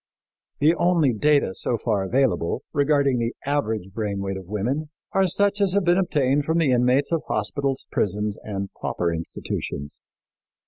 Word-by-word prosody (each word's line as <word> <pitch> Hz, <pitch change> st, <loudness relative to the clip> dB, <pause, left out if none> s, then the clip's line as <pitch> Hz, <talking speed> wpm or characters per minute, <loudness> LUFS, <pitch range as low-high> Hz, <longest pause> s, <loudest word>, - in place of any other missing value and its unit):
The 155 Hz, +3 st, +4 dB
only 170 Hz, -6 st, +2 dB
data 140 Hz, -2 st, +2 dB
so 120 Hz, -, -1 dB
far 110 Hz, -2 st, 0 dB
available, 115 Hz, -5 st, 0 dB
regarding 140 Hz, -3 st, +2 dB
the 115 Hz, +1 st, -2 dB
average 110 Hz, -9 st, -1 dB
brain 105 Hz, -2 st, -2 dB
weight 100 Hz, 0 st, -3 dB
of 95 Hz, -2 st, -8 dB
women, 125 Hz, -, -2 dB, 0.2 s
are 195 Hz, -1 st, +3 dB
such 200 Hz, +3 st, +1 dB
as 195 Hz, -2 st, +3 dB
have 200 Hz, -1 st, +2 dB
been 175 Hz, +2 st, +4 dB
obtained 145 Hz, -6 st, +1 dB
from 160 Hz, +2 st, +1 dB
the 160 Hz, -5 st, +3 dB
inmates 125 Hz, +4 st, +2 dB
of 165 Hz, -2 st, +1 dB
hospitals, 135 Hz, +6 st, -2 dB
prisons 105 Hz, +1 st, 0 dB
and 100 Hz, -2 st, -4 dB
pauper 85 Hz, -1 st, -1 dB
institutions. 75 Hz, -3 st, -4 dB
130 Hz, 155 wpm, -24 LUFS, 105-150 Hz, 0.2 s, The